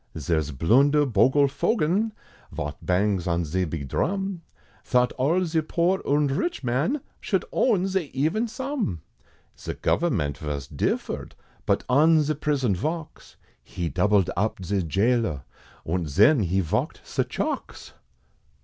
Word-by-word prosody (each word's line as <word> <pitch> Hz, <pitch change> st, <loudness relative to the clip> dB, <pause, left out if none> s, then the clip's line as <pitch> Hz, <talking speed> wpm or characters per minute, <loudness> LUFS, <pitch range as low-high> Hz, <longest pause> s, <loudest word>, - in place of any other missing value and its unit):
Zare's 80 Hz, 0 st, -1 dB
Blunder 135 Hz, -, +3 dB
Bogle 130 Hz, +4 st, +4 dB
Fogen, 195 Hz, -, 0 dB, 0.4 s
Vot 75 Hz, 0 st, -4 dB
bangs 95 Hz, 0 st, +1 dB
on 85 Hz, 0 st, 0 dB
ze 90 Hz, +4 st, -1 dB
big 75 Hz, -4 st, -5 dB
dhrum, 195 Hz, -, -1 dB, 0.4 s
Thought 125 Hz, -1 st, +2 dB
all 165 Hz, +8 st, +1 dB
ze 160 Hz, -1 st, 0 dB
poor, 175 Hz, +4 st, 0 dB
und 145 Hz, -1 st, +1 dB
rich 245 Hz, -, -2 dB
man, 140 Hz, -, 0 dB, 0.2 s
Should -, -, -1 dB
own 205 Hz, -8 st, +2 dB
ze 190 Hz, -6 st, -1 dB
even 160 Hz, -, 0 dB
sum; 255 Hz, -, -3 dB, 0.5 s
Ze -, -, -6 dB
government 70 Hz, -1 st, 0 dB
vos 75 Hz, -3 st, -4 dB
differed, -, -, -3 dB, 0.3 s
But -, -, +2 dB
on 155 Hz, +5 st, +5 dB
ze 155 Hz, +1 st, 0 dB
prison 140 Hz, -6 st, 0 dB
valks, 160 Hz, -, -5 dB, 0.3 s
He 85 Hz, -2 st, -4 dB
doubled 105 Hz, -1 st, +2 dB
up 100 Hz, -1 st, -1 dB
ze 100 Hz, +1 st, 0 dB
gaoler, 100 Hz, -, 0 dB, 0.4 s
Und 85 Hz, -1 st, -2 dB
zen, 105 Hz, -, +5 dB
he 95 Hz, +3 st, +1 dB
valked 80 Hz, -, -2 dB
ze -, -, -1 dB
chalks! -, -, -4 dB
125 Hz, 135 wpm, -25 LUFS, -, 0.5 s, on